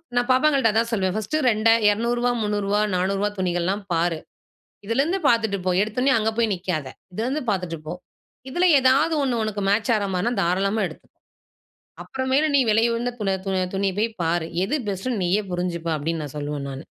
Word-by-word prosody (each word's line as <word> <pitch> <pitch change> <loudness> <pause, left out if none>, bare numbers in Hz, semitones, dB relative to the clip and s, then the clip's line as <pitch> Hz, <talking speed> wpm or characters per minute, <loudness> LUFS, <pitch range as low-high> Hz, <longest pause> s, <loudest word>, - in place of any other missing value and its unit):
நான் 245 0 +2
பாப்பாங்கள்ட 270 -1 +3
அதான் 225 +2 +1
சொல்வேன். 190 -4 0
பர்ஸ்ட் 215 +8 -3
ரெண்டா 220 +1 +4 0.2
200 235 +4 0
ரூபாய், 245 0 0
300 210 -1 -1
ரூபாய், 210 +1 +1
400 185 +2 0
ரூபாய் 205 +1 -1
துணிகள்லாம் 185 +2 -1
பாரு. 165 -1 0 0.7
இதில 230 +5 0
இருந்து 345 +6 0
பார்த்துட்டு 220 -4 +2
போ. 185 - +1
எடுத்த 215 +2 -4
உடனே 265 +1 +3
அங்க 220 0 +1
போய் 230 -2 +1
நிக்காத. 175 -5 -3 0.2
இதில 215 +5 -3
இருந்து 280 +4 -2
பார்த்துட்டு 180 -5 -2
போ. 160 - -4 0.5
இதில 350 +7 +1
ஏதாவது 270 +5 +3
1 250 -4 0
உனக்கு 210 -1 -3
மேட்ச் 210 +4 +1
ஆற 210 - 0
மாரினா 210 +7 0
தாராளமா 195 +5 +1
எடுத்துக்கொ. 160 - -13 0.9
அப்புறமேல் 265 +3 0
நீ 280 - +6
விலை 220 +2 +3
உயர்ந்த 240 +1 -2 0.3
துண 190 -1 0 0.2
துணிய 195 0 0
போய் 225 +2 +1
பாரு. 165 0 0 0.2
எது 205 - -2
பெஸ்ட்னு 205 +3 -2
நீயே 190 +4 +1
புரிஞ்சுப்ப 175 -2 -2
அப்டினு 160 +2 -3
நான் 145 -2 -7
சொல்வேன் 145 -1 -4
நானு. 135 +1 -7
210 Hz, 185 wpm, -23 LUFS, 180-235 Hz, 0.9 s, நீ